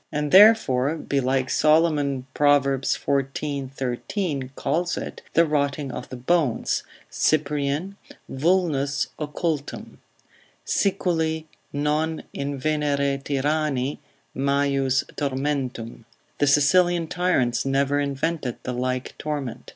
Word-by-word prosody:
And 150 -1 -2
therefore 165 - +6
belike 135 -4 -1
Solomon, 150 -4 +2
Prov. 145 -1 +4
xiv. 135 0 -1
13, 135 - -3
calls 170 +1 -1
it, - - -6
the 170 - +6
rotting 145 -2 -1
of - - -7
the - - -6
bones, 135 0 0 0.3
Cyprian, 150 +5 0 0.3
vulnus 140 -3 +1
occultum; 150 0 -4 0.7
———Siculi 165 -5 0 0.3
non 150 +2 -1
invenere 140 0 -1
tyranni 145 -1 -1 0.4
Majus 140 -1 +1
tormentum——— 130 -5 -3 0.3
The 145 - +3
Sicilian 170 +5 +4
tyrants 160 -9 +1
never 140 +1 +1
invented 140 -1 -2
the 125 - -3
like 130 +1 -3
torment. 145 -5 -4
145 Hz, 95 wpm, -24 LUFS, 135-155 Hz, 0.7 s, therefore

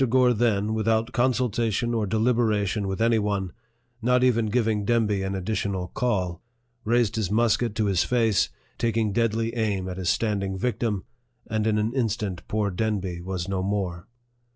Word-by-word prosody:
Gore 125 0 +4
then, 110 -2 +1
without 110 +1 +1
consultation 120 -2 +1
or 110 -3 0
deliberation 110 -2 +1
with 95 +3 -1
any 115 -1 +3
one, 100 -3 -2 0.5
not 125 +2 +3
even 115 -3 +3
giving 110 -2 +1
Demby 105 -3 +1
an 95 0 -2
additional 95 -1 -2
call, 90 -8 -1 0.4
raised 115 -1 +1
his 105 -5 0
musket 115 +1 +2
to 110 - +1
his 95 -3 +2
face, 115 -5 +2 0.3
taking 115 -3 +1
deadly 115 +1 0
aim 105 -5 -1
at 90 -1 -5
his 90 -2 -1
standing 100 -4 0
victim, 110 -2 -1 0.4
and 110 0 0
in 110 -1 +2
an 110 +2 0
instant 110 -7 -1
poor 105 -2 0
Demby 95 -3 -2
was 90 -1 -4
no 95 -1 -1
more. 95 -3 -2
110 Hz, 155 wpm, -25 LUFS, 100-115 Hz, 0.5 s, Gore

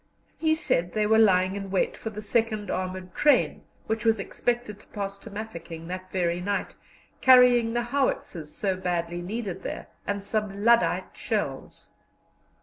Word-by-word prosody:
He 315 -1 +2
said 175 - 0
they 215 -1 +1
were 220 +1 +4
lying 185 -3 +4
in 195 -1 -5
wait 190 -1 0
for 220 - -5
the 210 0 -7
second 215 -2 0
armoured 185 -1 -4
train, 295 -1 +3 0.2
which 220 -1 -2
was 225 -2 +3
expected 235 0 -2
to - - -18
pass 200 -1 -5
to - - -11
Mafeking 170 -6 -7
that 185 +1 -6
very 175 -1 0
night, 200 +2 -2 0.5
carrying 250 -3 +6
the 240 0 0
howitzers 240 - -1
so 195 -2 -1
badly 175 -2 -2
needed 200 0 -4
there, - - -6 0.2
and 200 0 -2
some 205 -1 -2
lyddite 235 0 +3
shells. - - -3
200 Hz, 155 wpm, -26 LUFS, 185-225 Hz, 0.5 s, carrying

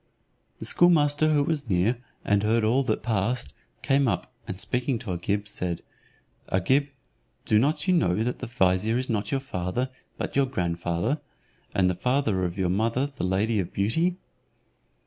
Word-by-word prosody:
The - - -7
schoolmaster 155 -3 +4
who 145 -2 +3
was 145 -5 -2
near, 100 +6 +2 0.3
and 100 -1 +3
heard 110 +2 +2
all 120 +5 +3
that 110 -3 -1
passed, 110 - 0 0.3
came 135 0 +3
up, 115 +4 -2
and 95 - -4
speaking 125 +3 0
to 105 -4 -5
Agib, 100 +4 -2
said, 90 -4 -3 0.7
"Agib, 130 +10 +2 0.6
do 105 - +4
not 150 - +1
you 185 - +4
know 110 - +2
that 125 +1 -2
the - - -5
vizier 110 0 +2
is 130 -1 -1
not 105 -2 -1
your 135 - +1
father, 125 0 -3 0.3
but - - -4
your 140 -1 +3
grandfather, 85 - -1 0.5
and 95 -2 +4
the 90 - +2
father 115 -2 0
of 90 +2 -4
your 95 -2 +1
mother 115 +8 0
the - - -4
lady 100 +4 +1
of 90 -3 -2
beauty? 165 - +1
110 Hz, 165 wpm, -26 LUFS, 95-135 Hz, 0.7 s, schoolmaster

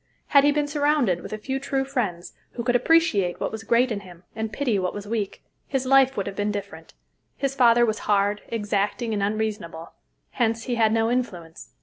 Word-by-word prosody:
Had 280 -2 +6
he 290 - +5
been 295 0 0
surrounded 290 - +1
with - - -9
a 215 - -3
few 265 +5 -3
true 270 0 -1
friends, 210 -11 -3 0.2
who 235 - -4
could 245 0 +1
appreciate 245 - +2
what - - -2
was 220 0 -6
great 240 +2 +2
in 210 - -2
him 180 -3 -14
and 220 0 -3
pity 240 -5 0
what 185 -1 -2
was 205 -1 -6
weak, 210 -3 -3 0.2
his 265 -1 -1
life 270 0 +4
would 200 - -1
have 195 - -5
been 205 +1 -1
different. 200 -1 -7 0.4
His 275 -1 -1
father 240 -2 +5
was 220 -2 -1
hard, 205 0 +2
exacting, 210 +1 -1
and 205 - -1
unreasonable; 205 -6 -3 0.4
hence 230 -2 0
he 245 - -3
had 225 -2 +3
no 225 +1 +1
influence. 175 - -4
225 Hz, 205 wpm, -24 LUFS, 200-260 Hz, 0.4 s, Had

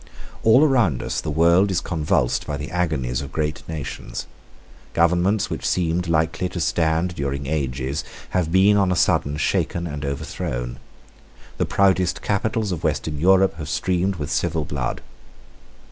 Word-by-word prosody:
All 115 +6 +6
around 120 - +2
us - - -2
the - - -4
world 85 +6 +4
is 95 -3 +1
convulsed 75 -8 0
by 75 -1 -2
the 70 -1 -6
agonies 75 -9 -1
of 70 -1 -7
great 75 +2 -2
nations. 75 -5 -5 0.7
Governments 90 +5 +2
which - - -2
lately - - -2
seemed 90 0 0
likely 80 +2 0
to 90 - -5
stand 80 +1 +1
during 70 -3 -3
ages 70 -1 -2 0.3
have 90 -3 0
been 95 +3 +5
on 95 -2 +3
a - - +2
sudden 75 -3 +2
shaken 85 +3 0
and 75 -3 -5
overthrown. - - -4 0.8
The - - +1
proudest 95 -2 +2
capitals 105 +1 0
of 85 - -4
Western 75 -2 -1
Europe 95 +1 +4
have 75 -3 -6
streamed 95 +5 0
with 75 -4 -5
civil 80 -1 0
blood. 65 -3 -3
80 Hz, 155 wpm, -22 LUFS, 70-90 Hz, 0.8 s, All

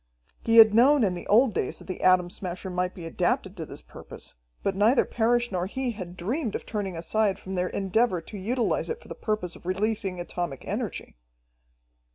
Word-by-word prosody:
He 230 0 +3
had 220 -2 +9
known 260 +4 +6
in 190 -4 +2
the 175 - -7
old 230 +2 +5
days 130 - -2
that - - -11
the 185 - -6
Atom 180 -1 +4
Smasher 185 0 -6
might 180 0 -1
be 175 - -8
adapted 180 +3 -1
to 160 -5 -6
this - - -10
purpose, - - -9 0.3
but 195 - 0
neither 220 +6 +4
Parrish 240 +1 +1
nor 180 -1 -1
he 260 +4 -2
had 185 -5 -8
dreamed 225 - -2
of - - -4
turning 195 -5 -3
aside 200 +4 +1
from 190 - -8
their 180 -1 0
endeavor 195 0 +1
to 165 +6 -11
utilize 230 +5 -1
it 460 0 -3
for - - -17
the - - -4
purpose 215 -5 -3
of - - -13
releasing 195 -1 -1
atomic 175 -5 -4
energy. - - -4
195 Hz, 200 wpm, -27 LUFS, 180-225 Hz, 0.3 s, had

